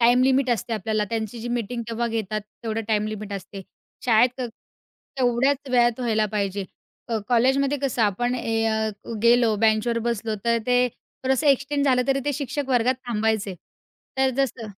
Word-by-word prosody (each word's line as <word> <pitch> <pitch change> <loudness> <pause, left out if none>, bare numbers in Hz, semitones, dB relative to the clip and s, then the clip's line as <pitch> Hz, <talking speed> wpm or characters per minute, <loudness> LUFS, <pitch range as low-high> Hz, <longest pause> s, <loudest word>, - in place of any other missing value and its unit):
Time 240 +2 +5
limit 265 0 +3
असते 235 0 -1
आपल्याला. 215 0 0
त्यांची 225 0 -3
जी 240 - -5
मीटिंग 240 0 -2
तेव्हा 235 +1 -1
घेतात, 215 -2 -2 0.2
तेवढं 225 0 -2
टाईम 215 -1 +1
लिमिट 215 -1 -5
असते. 195 0 -7 0.4
शाळेत 245 +2 +3
क 245 - -1 0.7
तेवढ्याच 260 +3 +1
वेळात 240 -1 +3
व्हायला 220 -3 +1
पाहिजे. 200 -1 -1 0.4
अ, 225 -1 0
कॉलेजमध्ये 265 +4 +3
कसं 255 -4 0
आपण 240 +5 +1
ए 225 -2 -1
अ, 220 0 0 0.3
गेलो 235 -1 +5
बेंचवर 225 +2 +2
बसलो, 225 -1 -1
तर 235 0 +3
ते 250 0 +4
थोडंसं 265 +4 -3
एक्सटेंड 280 +1 +2
झालं 255 -2 +3
तरी 275 0 +2
ते 290 - 0
शिक्षक 285 -1 -3
वर्गात 250 0 +3
थांबायचे. 215 -3 0 0.6
तर 265 0 +3
जसं 255 -4 -1
235 Hz, 160 wpm, -24 LUFS, 220-255 Hz, 0.7 s, टाईम